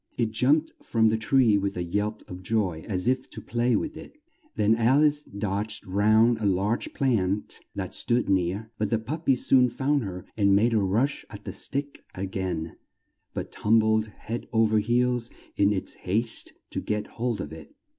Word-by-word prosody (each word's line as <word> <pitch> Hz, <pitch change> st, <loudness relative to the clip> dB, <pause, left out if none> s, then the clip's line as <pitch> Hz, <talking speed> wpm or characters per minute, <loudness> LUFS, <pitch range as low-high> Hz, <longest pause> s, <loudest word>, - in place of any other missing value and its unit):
It 115 Hz, -3 st, 0 dB
jumped 145 Hz, +8 st, +2 dB
from 115 Hz, -1 st, +1 dB
the 110 Hz, -, +1 dB
tree 115 Hz, -2 st, +4 dB
with 100 Hz, -1 st, -2 dB
a 90 Hz, -, -1 dB
yelp 105 Hz, +5 st, -3 dB
of 90 Hz, 0 st, -8 dB
joy 95 Hz, -5 st, -1 dB
as 95 Hz, 0 st, -2 dB
if 130 Hz, +1 st, 0 dB
to -, -, -8 dB
play 120 Hz, +1 st, 0 dB
with 315 Hz, -, -2 dB
it; 305 Hz, -, -12 dB, 0.4 s
then 105 Hz, +2 st, +3 dB
Al 125 Hz, +6 st, +4 dB
ice 150 Hz, 0 st, +2 dB
dodged 105 Hz, -2 st, -3 dB
round 110 Hz, +4 st, +3 dB
a 110 Hz, -, -2 dB
large 100 Hz, +4 st, 0 dB
plant 105 Hz, -7 st, 0 dB, 0.2 s
that -, -, -4 dB
stood 120 Hz, +1 st, +2 dB
near, 95 Hz, +3 st, 0 dB
but 105 Hz, -1 st, 0 dB
the 115 Hz, -, +2 dB
pup 150 Hz, +9 st, -6 dB
py 135 Hz, -, +5 dB
soon 125 Hz, 0 st, +4 dB
found 140 Hz, +2 st, 0 dB
her 90 Hz, -3 st, -6 dB
and 100 Hz, -2 st, +4 dB
made 115 Hz, +4 st, +3 dB
a 110 Hz, -, +3 dB
rush 110 Hz, +9 st, 0 dB
at 105 Hz, -1 st, -11 dB
the 95 Hz, -, -5 dB
stick 140 Hz, +7 st, -3 dB
a 95 Hz, -, -3 dB
gain, 90 Hz, -4 st, -4 dB, 0.6 s
but -, -, -4 dB
tum 110 Hz, +2 st, +2 dB
bled 110 Hz, 0 st, +2 dB
head 110 Hz, +2 st, -7 dB
o 115 Hz, -1 st, +4 dB
ver 110 Hz, 0 st, +2 dB
heels 120 Hz, +2 st, +1 dB, 0.3 s
in 100 Hz, 0 st, +3 dB
its 95 Hz, -2 st, -2 dB
haste 110 Hz, +5 st, -1 dB, 0.2 s
to -, -, -2 dB
get 105 Hz, 0 st, -2 dB
hold 120 Hz, -1 st, -3 dB
of 75 Hz, -, -5 dB
it. 250 Hz, -, -12 dB
110 Hz, 195 wpm, -26 LUFS, 100-120 Hz, 0.6 s, py